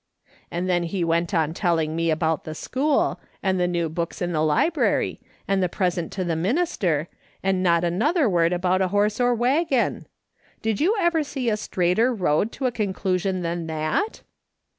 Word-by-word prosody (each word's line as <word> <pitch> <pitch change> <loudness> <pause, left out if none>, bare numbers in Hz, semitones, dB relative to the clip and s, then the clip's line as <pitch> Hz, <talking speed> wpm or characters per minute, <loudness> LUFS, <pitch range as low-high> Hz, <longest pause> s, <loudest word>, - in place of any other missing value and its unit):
And 175 +2 -3
tlien 175 -1 +1
he 175 +1 -2
went 170 +2 +1
on 160 -4 +1
telling 165 -4 0
me 165 0 0
about 160 0 0
the 155 - -6
school, 280 - 0 0.2
and 190 -1 +1
the 180 - +2
new 170 -2 0
books 170 +2 -4
in 175 0 -1
the 155 -2 0
library, 155 - +1 0.3
and 195 -1 +1
the 180 - +1
present 175 -3 -1
to 190 - -2
the 170 -2 -1
minister, 180 - 0 0.4
and 190 -1 +1
not 170 -2 +3
another 245 - +2
word 170 -4 +2
about 180 +1 +1
a 190 - +2
horse 205 +3 +1
or 245 0 +3
waggon! 265 +2 +1 0.6
Did 220 -2 0
you 385 +8 +3
ever 340 -3 +2
see 265 -5 -2
a - - +2
straighter 190 +4 +1
road 195 -1 +1
to 270 - -4
a 250 - +2
conclusion 190 -4 -1
than 170 0 -3
that 160 - -2
185 Hz, 180 wpm, -24 LUFS, 170-225 Hz, 0.6 s, not